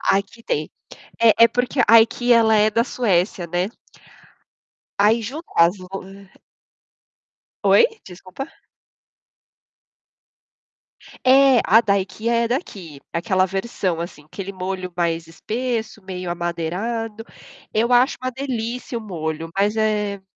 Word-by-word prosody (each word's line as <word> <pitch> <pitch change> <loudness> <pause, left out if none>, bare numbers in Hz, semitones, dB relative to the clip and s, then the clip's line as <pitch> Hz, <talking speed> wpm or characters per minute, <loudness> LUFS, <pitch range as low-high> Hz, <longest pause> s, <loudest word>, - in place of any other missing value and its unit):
Aqui 200 +4 -1
tem. 150 -6 -2 0.5
É 230 -2 +6
é - - +4
porque 245 +2 0
a 225 +1 +9
IKEA 240 +1 +3
ela 220 -1 +4
é 210 +1 +4
da 230 +2 +1
Suécia, 190 -7 0
né? 175 +4 -1 1.3
Aí 215 +3 +4
junta 280 - -6
as 170 +4 +5
lo 185 -1 -12 1.7
Oi? 475 - +6 0.2
Desculpa. 185 +8 -8 2.8
É, 265 -1 +6
a 225 +4 +6
da 200 -3 +2
IKEA 230 +4 -1
é 230 - 0
daqui, 190 - -5
aquela 185 +2 +1
versão 190 -3 -2
assim, 160 -3 -7
aquele 195 +5 -7
molho 185 -1 -5
mais 170 -1 -1
espesso, 220 +6 -4
meio 180 -2 -6
amadeirado. 190 +7 -3 0.5
Eu 230 +3 +1
acho 245 +3 +4
uma 255 - -1
delícia 250 -2 -4
o 230 - -3
molho, 165 -5 -5
mas 205 +2 +2
é 210 -2 0
210 Hz, 120 wpm, -21 LUFS, 180-235 Hz, 2.8 s, a